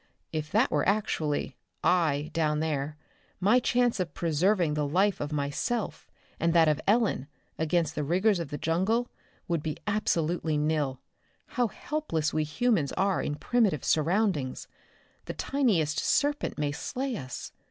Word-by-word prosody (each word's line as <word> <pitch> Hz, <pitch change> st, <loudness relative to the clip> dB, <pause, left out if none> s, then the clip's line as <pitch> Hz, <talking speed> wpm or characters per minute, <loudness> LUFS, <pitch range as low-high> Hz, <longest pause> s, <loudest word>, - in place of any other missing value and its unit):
"If 155 Hz, -1 st, -3 dB
that -, -, +3 dB
were 150 Hz, +4 st, +2 dB
actually 155 Hz, -, -1 dB, 0.3 s
'I' 155 Hz, -5 st, +2 dB
down 155 Hz, -2 st, +1 dB
there, 150 Hz, -1 st, -2 dB, 0.4 s
my 210 Hz, +7 st, +4 dB
chance 245 Hz, -2 st, +1 dB
of 175 Hz, -5 st, -3 dB
preserving 170 Hz, +1 st, +2 dB
the 150 Hz, -1 st, 0 dB
life 190 Hz, +7 st, +2 dB
of 145 Hz, +1 st, -3 dB
myself, 150 Hz, -, -2 dB, 0.3 s
and 165 Hz, 0 st, +2 dB
that 165 Hz, -1 st, +6 dB
of 150 Hz, -2 st, +2 dB
Ellen 210 Hz, -, +2 dB, 0.3 s
against 160 Hz, +1 st, +1 dB
the 150 Hz, -, -2 dB
rigors 185 Hz, +6 st, +2 dB
of 170 Hz, -, -3 dB
the 145 Hz, -, -4 dB
jungle, 195 Hz, +11 st, +1 dB, 0.4 s
would 170 Hz, -3 st, 0 dB
be 155 Hz, -1 st, -3 dB
absolutely 170 Hz, -6 st, 0 dB
nil. 150 Hz, -3 st, 0 dB, 0.5 s
How 245 Hz, -2 st, +1 dB
helpless 195 Hz, -, -2 dB
we 155 Hz, -, +1 dB
humans 170 Hz, -, +1 dB
are 195 Hz, 0 st, +1 dB
in 145 Hz, -, -2 dB
primitive 205 Hz, -, +1 dB
surroundings! 160 Hz, -4 st, +1 dB, 0.6 s
The -, -, -4 dB
tiniest 190 Hz, -, +1 dB
serpent 290 Hz, 0 st, +1 dB
may 150 Hz, -1 st, 0 dB
slay 260 Hz, -, -3 dB
us. 130 Hz, -, -6 dB
165 Hz, 145 wpm, -28 LUFS, 150-210 Hz, 0.6 s, that